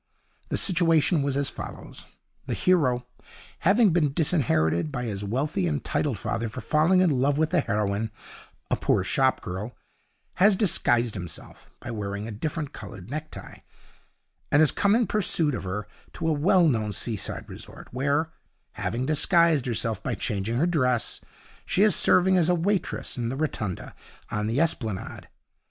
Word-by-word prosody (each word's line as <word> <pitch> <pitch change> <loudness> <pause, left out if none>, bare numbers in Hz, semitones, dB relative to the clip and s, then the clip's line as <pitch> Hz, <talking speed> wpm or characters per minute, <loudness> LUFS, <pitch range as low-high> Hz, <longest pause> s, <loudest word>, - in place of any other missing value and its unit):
The - - -1
situation 165 -3 +3
was 140 -1 0
as 140 -1 0
follows: - - -9 0.4
The - - -1
hero, 130 -9 +2 0.5
having 200 +3 +4
been 150 -5 +2
disinherited 125 - +1
by 125 -3 -3
his 105 -4 -4
wealthy 145 - -1
and 150 -3 -2
titled 145 -6 -1
father 115 +3 -3
for 105 - -7
falling 160 +5 +3
in 180 -3 +3
love 140 +2 +1
with 155 0 +1
the 180 - +3
heroine, 105 -3 -1 0.6
a - - +4
poor 95 - +1
shop 130 +7 +1
girl, 100 +7 -5 0.7
has 200 +1 +6
disguised 120 - +2
himself 90 -5 -9
(by 120 - -7
wearing 100 -1 -4
a - - -6
different 150 +6 -4
coloured 105 -1 -10
necktie) 155 +1 -7 0.9
and 145 - +5
has 155 - +5
come 200 +1 +2
in 235 0 +3
pursuit 175 -8 +2
of 110 - -4
her 105 +3 -4 0.3
to - - -3
a 160 - +3
well 170 +4 +4
known 110 -7 0
seaside 105 0 -4
resort, - - -11
where, 140 +5 0 0.4
having 125 +3 -3
disguised 155 -1 +3
herself 115 -2 -1
by 125 - -2
changing 105 0 -2
her 150 - +2
dress, 130 -9 0 0.4
she 195 - +2
is 210 -4 +4
serving 185 +1 +4
as 170 0 +2
a 180 - +4
waitress 185 -2 -1
in 120 -1 -2
the 130 - -3
Rotunda, 110 - -3 0.4
on 105 0 -1
the 115 +5 0
Esplanade. 115 - -2
140 Hz, 160 wpm, -26 LUFS, 110-165 Hz, 0.9 s, has